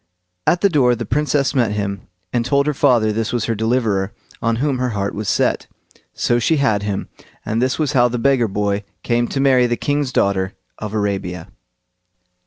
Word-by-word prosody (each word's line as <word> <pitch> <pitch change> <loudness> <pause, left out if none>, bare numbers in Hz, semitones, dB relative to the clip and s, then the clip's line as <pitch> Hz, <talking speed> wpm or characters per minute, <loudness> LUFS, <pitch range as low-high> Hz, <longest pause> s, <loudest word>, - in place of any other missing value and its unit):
At 175 - +3
the 200 - +4
door 130 -7 +3
the 115 0 -5
Princess 145 +2 +1
met 120 -6 +1
him, 100 -1 -3 0.3
and 120 -1 +1
told 140 +3 +2
her 150 - +1
father 120 -6 +3
this 110 +1 -1
was 120 -2 -1
her 115 - 0
deliverer, 110 -3 0 0.3
on 115 0 +1
whom 135 +1 0
her 125 0 0
heart 100 0 -1
was 105 -2 -3
set. - - +1 0.4
So 120 - +1
she 155 +7 +2
had 110 -8 +2
him; 100 -1 -3 0.4
and 110 +2 -1
this 130 0 +1
was 155 -2 0
how 125 -2 +5
the 120 0 -3
beggar 130 -1 +2
boy 100 0 -1 0.2
came 120 0 +1
to 135 - -3
marry 130 -3 +4
the 120 0 -1
king's 145 -2 -1
daughter 95 -5 +1 0.3
of 105 0 -5
Arabia. 95 -5 -2
120 Hz, 195 wpm, -19 LUFS, 105-135 Hz, 0.4 s, how